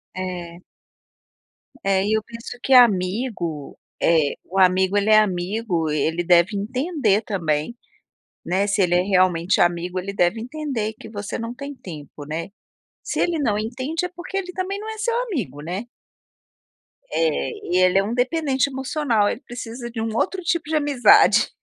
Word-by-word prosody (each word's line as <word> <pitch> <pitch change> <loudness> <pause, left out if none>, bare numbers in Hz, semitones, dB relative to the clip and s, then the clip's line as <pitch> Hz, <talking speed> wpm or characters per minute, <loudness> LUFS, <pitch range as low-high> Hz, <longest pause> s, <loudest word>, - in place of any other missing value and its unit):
É. 175 -2 -5 1.2
É. 195 -1 +2
E, 210 - +1
eu 220 -1 +1
penso 230 +2 -9
que 270 - +2
amigo, 190 - +2 0.2
eh, 160 -4 +3
o 190 +2 -2
amigo, 190 +1 +4
ele 205 +1 +1
é 215 0 +8
amigo, 185 -3 -1
ele 155 +3 0
deve 175 +4 +4
entender, 250 - 0
também, 165 -1 -1 0.7
né, 190 +3 +1
se 200 0 +1
ele 175 -2 +3
é 180 - +4
realmente 185 -2 +2
amigo 175 +1 +1
ele 195 +2 -5
deve 195 +3 +1
entender 255 -5 -3
que - - -10
você 205 -2 -5
não 230 +1 -5
tem 280 +3 -7
tempo, 150 - -10
né. 165 +3 -4 0.5
Se - - -3
ele 345 -2 +1
não 225 -8 +1
entende 255 +10 -3
é - - -4
porque 360 +3 -5
ele 365 -2 -4
também 375 +2 -3
não 435 +1 -6
é 440 - -6
seu 465 +2 -1
amigo, 225 - -4
né. 180 +9 -4 1.3
É. - - 0 0.2
E, 180 - +1
ele 185 +1 +4
é 195 - +4
um 215 +4 -3
dependente 270 +1 +1
emocional, 265 -5 0
ele 235 - -4
precisa 240 0 -7
de 230 -1 -5
um 225 -1 -2
outro 375 +9 0
tipo 340 -1 0
de 320 - 0
amizade. 295 +7 +5
215 Hz, 165 wpm, -22 LUFS, 180-265 Hz, 1.3 s, é